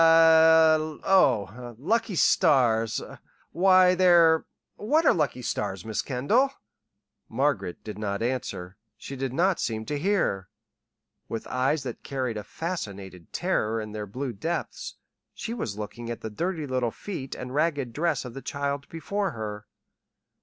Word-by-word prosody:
"Eh? 160 -1 +6
Oh, 120 - +2
lucky 220 - 0
stars 120 - +3 0.5
why, 185 +1 +5
they're 175 -3 +5 0.3
what 305 +10 +1
are - - +6
lucky 140 -6 -1
stars, 100 -5 -3
Miss 110 -1 -1
Kendall?" 175 - +1 0.8
Margaret 115 -8 -1
did 105 -1 -7
not 100 0 -2
answer. 100 -7 -3 0.2
She 135 - -8
did 135 -1 -3
not 175 +7 +1
seem 110 -2 -2
to 145 +3 -3
hear. 150 - 0 0.8
With 115 - -4
eyes 135 +4 0
that 125 -3 -6
carried 130 -5 -3
a 105 - -5
fascinated 100 - -6
terror 110 +1 0
in 105 -1 -6
their 105 -1 -5
blue 125 +5 -4
depths, 165 +12 -4 0.4
she 230 - -5
was 110 - -4
looking 115 +3 -6
at 120 - -5
the 110 - -5
dirty 165 - -2
little 130 -3 0
feet 135 - -7
and 125 - -7
the - - -8
ragged 145 -5 0
dress 155 -2 0
of 125 - -8
the 135 - -7
child 140 0 -3
before 195 +5 -2
her. 105 -2 -6
135 Hz, 145 wpm, -26 LUFS, 110-165 Hz, 0.8 s, Eh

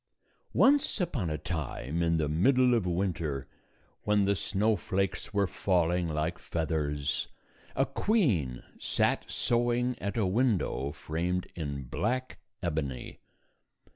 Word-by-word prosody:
Once 275 -3 +4
upon 145 - -1
a 75 - -1
time, 80 0 -3
in 85 -1 +2
the 75 -2 +1
middle 125 - +4
of 110 -6 +2
winter, 85 -6 -1 0.6
when 105 -1 +3
the 100 +1 +2
snowflakes 100 -1 0
were 100 -1 +2
falling 90 -2 +1
like 80 +2 -1
feathers, 75 -3 -1 0.5
a 135 - +3
queen 130 - +1 0.2
sat - - +1
sewing 120 +1 +1
at 100 +3 -3
a 110 - +2
window 95 - +1
framed 85 +5 -2
in 70 -4 -4
black 125 - -2 0.2
ebony. 75 -7 -3
90 Hz, 115 wpm, -30 LUFS, 80-115 Hz, 0.6 s, Once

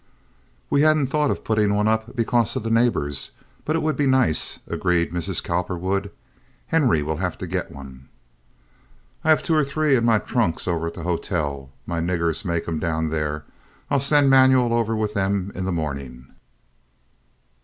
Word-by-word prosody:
"We 140 - +3
hadn't 155 -3 +3
thought 150 -1 +2
of - - -2
putting 105 -2 +1
one 105 +1 +1
up 110 +3 -1
because 120 -2 +1
of - - -2
the 115 - -2
neighbors, 115 -12 +1 0.3
but 155 - 0
it 165 - 0
would 155 0 0
be 145 - +1
nice," 130 -11 +2
agreed 85 -2 0
Mrs. 85 -2 -2
Cowperwood. 90 +3 -2 0.6
"Henry 130 - +2
will 80 +1 -2
have 90 0 -3
to - - -5
get - - -3
one." 65 -1 -12 1.1
"I 160 - 0
have 155 - +4
two 165 - 0
or 155 -1 +4
three 145 0 +1
in 120 - +1
my 115 -2 +4
trunks 105 -8 -1
over 85 -2 -1
at 85 - -6
the 85 - -7
hotel. 75 -6 -2 0.2
My 85 -1 -3
niggers 85 -1 -1
make 85 -4 -2
'em 80 -2 -2
down 80 0 -1
there. 75 -1 -3 0.5
I'll 140 - +3
send 140 0 +4
Manuel 130 -2 +5
over 115 -1 +1
with 105 -1 -2
them 100 -1 -1
in 95 - -4
the 95 - -1
morning." 70 -6 -5
100 Hz, 175 wpm, -23 LUFS, 80-125 Hz, 1.1 s, Manuel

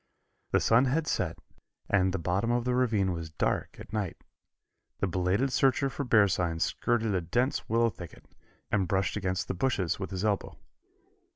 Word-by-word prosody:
The - - +3
sun 115 +4 +4
had 150 +5 +1
set 85 - -1 0.5
and 95 -2 +2
the 95 - -1
bottom 90 +7 -1
of 120 0 +1
the 125 - +1
ravine 110 -7 +2
was 85 -2 -5
dark 80 - -1
as - - -11
night. 105 -6 -2 0.8
The - - 0
belated 95 +8 0
searcher 135 +1 +2
for 140 - -3
bear 110 -5 +5
signs 85 -3 0
skirted 115 -3 0
a 95 - +1
dense 120 - -1
willow 115 +1 +3
thicket, 85 -5 -11 0.5
and 95 -4 +1
brushed 95 0 0
against 95 -2 -2
the - - -1
bushes 95 -4 0
with 95 - -4
his 95 +1 -3
elbow. 105 -2 -1
100 Hz, 175 wpm, -29 LUFS, 90-120 Hz, 0.8 s, bear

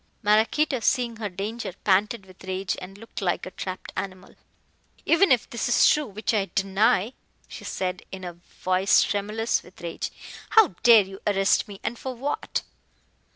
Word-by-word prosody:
Maraquito, 225 +7 +3
seeing 235 0 +1
her 215 -2 -3
danger, 200 +2 -5
panted 200 +2 +2
with 185 0 -17
rage, 190 +1 -2
and 190 +2 -9
looked 225 0 -9
like 180 -3 -1
a 185 - -7
trapped 185 0 -6
animal. 185 -1 -6 0.7
"Even 335 +1 +4
if 250 -3 +3
this 235 - -2
is 240 - +5
true, 300 -2 +3
which 215 +3 -2
I 200 -3 0
deny," 195 +3 +2 0.3
she - - -10
said 185 -1 -3
in 190 -1 -7
a 175 -1 -5
voice 185 +2 +1
tremulous 210 +3 -1
with 180 - -17
rage, 170 -1 -4 0.5
"how 435 -7 +8
dare 230 -3 +8
you 195 0 -11
arrest 195 +1 +2
me, 200 -2 -10
and 235 - -3
for 260 -1 -5
what?" 275 +5 -3
205 Hz, 165 wpm, -25 LUFS, 190-230 Hz, 0.7 s, how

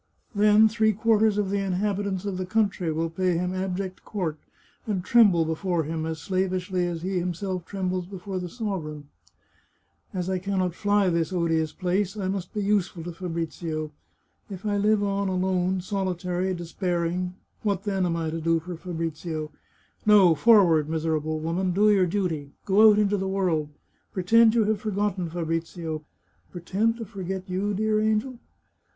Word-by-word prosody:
Then 210 +1 +6
three 220 0 +2
quarters 220 0 +3
of 200 -2 0
the 200 - +1
inhabitants 195 0 -1
of 195 -2 -2
the 185 - -3
country 200 -5 0
will 165 +1 -2
pay 180 0 0
him 180 +1 -1
abject 185 0 -3
court, 170 -7 -3 0.5
and 190 -4 -2
tremble 200 -9 +5
before 165 +1 -1
him 160 +1 -3
as 160 0 -3
slavishly 185 -1 -1
as 170 -1 -4
he 185 0 -1
himself 180 0 -3
trembles 185 -2 -3
before 190 0 -5
the 180 -1 -5
sovereign. 165 -9 -5 0.5
" - - -43
As 180 -1 -2
I 190 -1 0
can 195 +1 -2
not 180 -2 0
fly 205 0 +2
this 165 0 0
odious 165 -3 0
place, 190 +2 -1
I 190 -2 -2
must 190 -2 -3
be 210 - -2
useful 195 -4 0
to 175 - -5
Fabrizio. 165 -3 -4 0.6
If 195 0 -8
I 205 -1 +1
live 205 +1 +2
on 200 0 0
alone, 185 0 0
solitary, 185 -1 -2
despairing, 175 +1 -2 0.3
what, 200 -3 -1
then, 195 -2 0
am 170 -2 0
I 165 -1 -2
to 165 0 -4
do 165 +1 +2
for 175 +2 -7
Fabrizio? 160 -2 -4 0.5
No! 200 -5 +6
forward, 165 -4 +5
miserable 155 -1 -1
woman! 175 +3 -1
Do 210 +3 +4
your 190 -3 +4
duty. 165 -7 -2
Go 210 +3 +7
out 210 - +4
into 205 -1 +2
the 190 0 -2
world. 175 -6 0 0.4
Pretend 220 +5 +4
you 230 - +4
have 210 -1 0
forgotten 205 -4 -1
Fabrizio. 165 -1 -3 0.5
Pretend 200 +6 0
to 230 - -5
forget 190 -2 -5
you, 195 +2 -1
dear 215 +1 +1
angel 220 +3 0
185 Hz, 165 wpm, -26 LUFS, 170-205 Hz, 0.6 s, Go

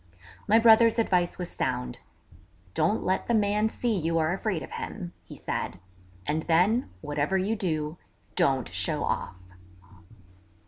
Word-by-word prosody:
My 215 +2 +6
brother's 230 0 +6
advice 180 -6 +1
was 180 -1 -4
sound: 60 0 -2 0.7
'Don't 210 - +1
let 185 - 0
the 235 - +2
man 210 +1 +2
see 235 0 -1
you 165 -2 0
are 160 +1 +2
afraid 195 -3 -2
of - - -10
him,' 175 -2 -6
he - - -10
said, - - -4 0.5
'and 155 +2 0
then, 190 +10 +3
whatever 150 +4 0
you 200 +4 0
do, 160 -6 -2 0.4
don't 135 -3 +1
show - - 0
off.' 90 -1 -4
180 Hz, 140 wpm, -27 LUFS, 155-220 Hz, 0.7 s, My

